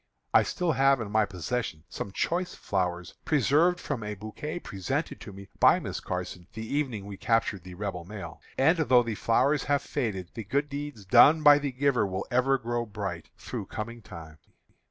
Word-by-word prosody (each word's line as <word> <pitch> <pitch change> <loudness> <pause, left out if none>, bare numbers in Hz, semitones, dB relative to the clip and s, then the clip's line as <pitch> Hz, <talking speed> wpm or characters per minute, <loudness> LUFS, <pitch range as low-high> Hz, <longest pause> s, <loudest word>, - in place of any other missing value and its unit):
I - - +7
still 180 -3 -1
have 135 -1 +4
in 105 -3 -5
my 110 0 +3
possession 95 -2 -4
some 95 - -6
choice 175 - -1
flowers, 90 -2 -2
preserved 155 +5 +3
from 135 -8 -3
a 105 0 -4
bouquet 110 - -6
presented 95 - -3
to - - -8
me 100 0 -11
by - - +6
Miss - - -4
Carson 90 -1 -5
the 110 0 -6
evening 125 -6 -2
we 100 -1 -8
captured 110 -5 0
the 90 -1 -10
Rebel 95 -3 -4
mail; 100 +2 -8 0.2
and 160 +6 +4
though 130 -6 +5
the 115 -1 -3
flowers 135 +7 +2
have 145 0 +1
faded, 95 -7 -3
the 115 - -5
good 140 +8 -1
deeds 145 -7 -6
done 155 +11 +7
by 145 -1 +8
the 140 -1 -2
giver 130 -4 +1
will 95 0 -3
ever 130 +2 +3
grow 120 -1 -2
bright 105 - -5
through - - -6
coming 115 +2 -6
time. 80 -5 -11
115 Hz, 185 wpm, -28 LUFS, 95-140 Hz, 0.2 s, by